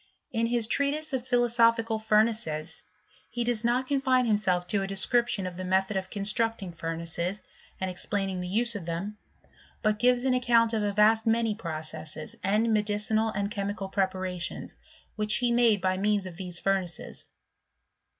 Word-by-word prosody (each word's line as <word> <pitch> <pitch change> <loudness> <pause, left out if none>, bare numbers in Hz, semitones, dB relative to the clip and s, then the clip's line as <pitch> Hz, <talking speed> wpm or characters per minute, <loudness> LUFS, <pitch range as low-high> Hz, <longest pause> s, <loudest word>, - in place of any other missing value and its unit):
In 230 -1 0
his 235 -1 +1
treatise 280 +5 0
of 255 -1 -2
philosophical 230 -2 +3
furnaces 215 -8 0 0.5
he 240 +1 -2
does 235 -1 +1
not 245 +2 +1
confine 260 -2 +2
himself 200 -5 +1
to 205 - +1
a 195 - -2
description 195 +2 +1
of 180 -1 -6
the 185 - -4
method 190 +2 +1
of 190 -1 -2
constmcting 210 -2 -1
furnaces, 170 +4 -4 0.4
and 190 - -1
explaining 190 0 -2
the 180 - -4
use 235 +5 +1
of 195 -6 -6
them, 195 +5 -4 0.6
but 215 -1 +1
gives 245 +1 +3
an 265 -1 +2
account 235 -2 +3
of 220 - +1
a 205 -1 0
vast 220 +2 +3
many 225 -1 +2
processes, 155 -5 -6
and 215 +4 +2
medicinal 210 +1 +1
and 200 +1 -2
chemical 200 -2 -3
preparations, 185 -2 -2 0.4
which 210 0 +1
he 245 -1 +1
made 235 -3 +4
by 185 0 +1
means 205 -1 +1
of 180 -2 -8
these 180 -2 -4
furnaces. 190 -2 -2
210 Hz, 160 wpm, -28 LUFS, 185-230 Hz, 0.6 s, made